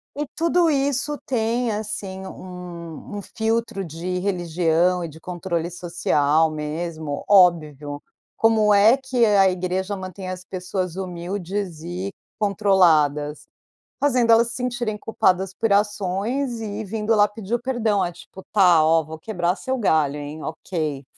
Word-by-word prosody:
E 295 +1 -3
tudo 335 +1 +3
isso 285 0 0
tem, 235 -1 0
assim, 205 -3 -5
um 180 -2 -9 0.3
um 205 - -4
filtro 225 -1 -2
de 175 +2 -4
religião 175 -1 +1
e - - -3
de 160 +1 -13
controle 175 -1 -3
social 160 -3 +1
mesmo. 155 0 -4
Óbvio. 155 -7 +3 0.4
Como 220 -2 +4
é 210 +4 +6
que 260 -3 +1
a 200 -3 +5
igreja 185 +2 -2
mantém 185 0 -7
as 185 0 -6
pessoas 185 -1 -4
humildes 185 -1 -4
e 180 +4 -4 0.3
controladas? 165 -8 +2 0.5
Fazendo 250 -5 +3
elas 230 +1 +5
se 230 - -6
sentirem 245 -3 -2
culpadas 190 -3 +1
por 225 +3 -1
ações 210 +5 0
e 215 -1 -4
vindo 215 +2 0
lá 205 -1 +5
pedir 205 +1 -5
o 240 - 0
perdão, 230 -6 +1
a 175 - -1
tipo: 175 +2 -13
"Tá, 180 -6 +5
ó, 160 +1 +4
vou 160 +1 -9
quebrar 175 -1 -1
seu 260 +4 -2
galho, 155 - +2
hein. 150 +1 -7
Ok. 155 -4 -4
190 Hz, 140 wpm, -23 LUFS, 170-220 Hz, 0.5 s, é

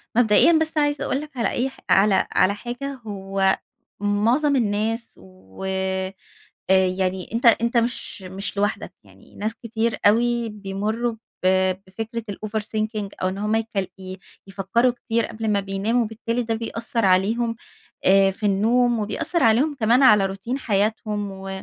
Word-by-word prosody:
مبدئيًا 240 +7 +5
بس، 320 0 +1
عايزة 290 -1 +1
أقول 275 - -1
لك 300 -3 -11
على 230 - +1
أي 260 +2 -1
ح - - -18
على 195 -1 +4
على 200 +2 +3
حاجة، 245 +5 -5
هو 195 -1 0 0.4
معظم 230 +8 +2
الناس، 225 +1 -1
و 95 - -13
آآ، 190 0 -2 0.6
يعني 185 0 +1
أنت 235 +1 0
أنت 235 +1 +4
مش 235 -3 -1
مش 190 +2 -6
لوحدك 205 +1 -1
يعني، - - -20
ناس 215 +2 -2
كتير 230 0 -2
أوي 235 +2 +3
بيمرّوا 210 +3 -3 0.3
ب - - +5 0.4
بفكرة 225 +4 -5
الoverthinking 215 0 -3
أو 185 - +2
إن 190 +1 -4
هم 210 +1 0
يك 225 0 -1 0.3
ي 185 0 -8 0.3
يفكروا 195 +6 +1
كتير 230 -2 -1
قبل 220 0 -4
ما 205 -1 +2
بيناموا، 200 +5 0
وبالتالي 230 +2 -3
ده 225 -1 -2
بيأثر 230 0 -3
عليهم 220 +5 +2 0.5
آآ، 195 +1 +5
في 200 +2 -3
النوم، 230 +4 +2
وبيأثر 270 - -1
عليهم 250 +7 +3
كمان 235 +5 +4
على 210 -6 +6
روتين 195 +7 -4
حياتهم، 210 -2 -1
و 195 0 -8
215 Hz, 150 wpm, -23 LUFS, 195-235 Hz, 0.6 s, على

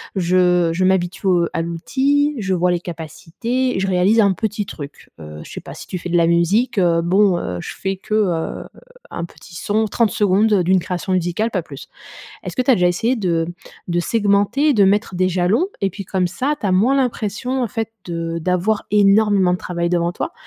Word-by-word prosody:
Je 180 -2 +2
je 180 +3 0
m'habitue 185 +1 0
au 175 -2 +3
à 165 - -1
l'outil, 275 - 0
je 190 -3 -1
vois 180 0 +1
les 175 - 0
capacités, 180 - -3
je 195 - 0
réalise 190 +4 +3
un 200 -2 +3
petit 210 0 -3
truc, 145 -5 -10
heu, 75 -1 -9
je - - -12
sais - - -7
pas - - -10
si - - -10
tu 180 - -5
fais 180 - -6
de 175 - +2
la 170 - +4
musique, 195 +8 +2
heu, 170 -2 +3
bon, 190 +1 +3
heu, 90 -1 -4
je - - -7
fais 195 0 -2
que, 215 +3 -4
heu, 180 -6 -1 0.5
un 170 - -4
petit 170 - -16
son, 215 +5 0
30 220 +1 +1
secondes 205 0 +2
d'une 185 +2 +3
création 180 +1 -3
musicale, 180 +5 -1
pas 185 - -1
plus. 140 -4 -11 0.6
Est-ce - - -5
que - - +1
tu 260 - +2
as 255 - +7
déjà 180 -3 +2
essayé 225 +9 0
de 170 -6 0 0.4
de 175 0 0
segmenter 205 - +1
et 280 - +2
de 200 -2 +5
mettre 200 0 +1
des 185 +1 +2
jalons 185 - +1
et 195 - +1
puis 200 - -8
comme 185 0 0
ça, 260 +12 -1
tu - - -2
as - - +1
moins 215 +9 +3
l'impression 250 0 -1
en - - +1
fait 225 0 -4 0.2
de 165 -1 -4
d'avoir 180 +5 0
énormément 205 -2 +4
de - - -4
travail 170 -2 -3
devant 175 0 0
toi - - -4
185 Hz, 215 wpm, -19 LUFS, 175-215 Hz, 0.6 s, as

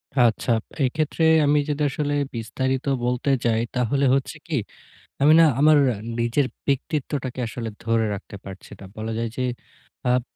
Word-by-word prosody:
আচ্ছা। 120 -1 +2 0.3
এক্ষেত্রে 155 +4 -1 0.2
আমি 145 +1 +4
যদি 150 +1 -2
আসলে 145 +1 -2 0.2
বিস্তারিত 130 +4 -2 0.2
বলতে 125 +3 -1 0.2
যাই, 115 -1 +2
তাহলে 125 +3 +1
হচ্ছে 140 +4 -3
কি? 155 -5 -1 0.7
আমি 150 +2 +7
না - - +8 0.2
আমার 155 0 +6 0.4
নিজের 120 +4 +1 0.2
ব্যক্তিত্বটাকে 135 -2 -2
আসলে 115 -1 -5 0.2
ধরে 115 -1 +1
রাখতে 100 0 -9
পারছি 95 0 -10
না। - - -10
বলা 110 +1 -4
যায় 115 -1 -2
যে 130 - -1 0.7
আব 125 - +2
130 Hz, 145 wpm, -23 LUFS, 115-145 Hz, 0.7 s, না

